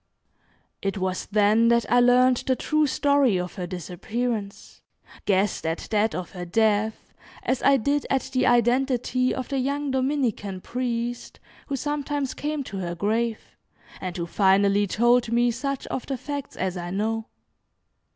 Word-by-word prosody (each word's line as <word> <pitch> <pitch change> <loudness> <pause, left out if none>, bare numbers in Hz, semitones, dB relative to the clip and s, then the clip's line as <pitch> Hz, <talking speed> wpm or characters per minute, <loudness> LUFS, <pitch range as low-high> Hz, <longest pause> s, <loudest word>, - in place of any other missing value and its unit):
It 195 +1 -2
was 185 -1 -2
then 210 +2 +4
that 235 0 +3
I 245 - +4
learned 250 +1 +5
the 260 - +3
true 305 +3 +1
story 280 -7 +2
of 180 0 -4
her 180 -2 -5
disappearance, 200 +5 -4 0.4
guessed 200 0 +1
at 160 +1 -3
that 215 +1 +2
of 180 - -5
her 180 -2 -6
death, 220 +3 0 0.3
as 260 - 0
I 275 0 +5
did 285 +4 0
at 270 - +1
the 255 0 +2
identity 250 +1 +2
of 255 - -4
the 275 -2 -1
young 280 +2 -1
Dominican 255 -8 -1
priest, 240 0 -3 0.3
who 280 - -2
sometimes 290 -1 -2
came 300 -1 -3
to 200 -6 -7
her 175 -2 -3
grave, 220 +5 -2 0.5
and 185 -1 -4
who 170 - -2
finally 200 +2 +3
told 240 +3 +3
me 240 +1 +3
such 275 +3 -3
of 255 - -5
the 270 - -2
facts 285 +2 -6
as 185 -1 -2
I 175 0 -5
know. 220 +4 -2
235 Hz, 155 wpm, -25 LUFS, 200-260 Hz, 0.5 s, learned